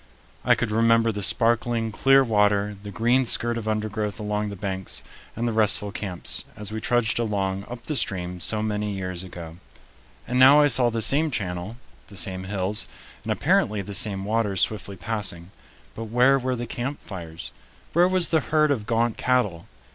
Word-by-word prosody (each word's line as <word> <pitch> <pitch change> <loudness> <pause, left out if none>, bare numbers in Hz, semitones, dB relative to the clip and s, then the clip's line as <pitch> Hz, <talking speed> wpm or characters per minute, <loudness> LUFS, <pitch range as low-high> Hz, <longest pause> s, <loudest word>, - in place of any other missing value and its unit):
I - - +4
could 115 -3 -2
remember 115 +1 +3
the 105 -1 -5
sparkling, 115 +1 +1
clear 135 +5 +4
water, 105 -3 +2
the 105 - -8
green 120 +6 +2
skirt 120 -1 +2
of 115 -2 -5
undergrowth 105 -1 -2
along 105 0 -2
the 100 - -6
banks, 95 -1 -4 0.3
and 120 +2 -2
the - - 0
restful 110 -2 +2
camps, 95 -4 -4
as 105 -1 -6
we 110 0 -4
trudged 120 0 +1
along 100 -3 -2
up 120 -1 -8
the 150 - -3
stream 90 -6 -2
so 110 +4 -1
many 105 -1 -2
years 90 -2 -4
ago. 85 -3 -9 0.7
And 125 +1 0
now 135 +3 +8
I 145 0 +5
saw 125 -2 +5
the 115 -1 -1
same 150 +8 +3
channel, 95 -2 -4 0.3
the 100 - -13
same 95 -1 -2
hills, 100 +2 -2 0.3
and - - -4
apparently 105 -1 +1
the 100 +2 -8
same 100 -3 +1
waters 105 -3 0
swiftly 100 -2 -2
passing. 95 -3 -5 0.4
But 115 - -6
where 125 +5 +3
were 130 0 -1
the 120 0 -4
camp 125 +5 -5
fires? 85 -5 -8 0.4
Where 175 +2 +5
was 185 -2 +2
the 160 - +3
herd 155 0 +2
of 110 -7 -2
gaunt 115 0 +1
cattle? 105 -10 0
110 Hz, 180 wpm, -24 LUFS, 100-120 Hz, 0.7 s, now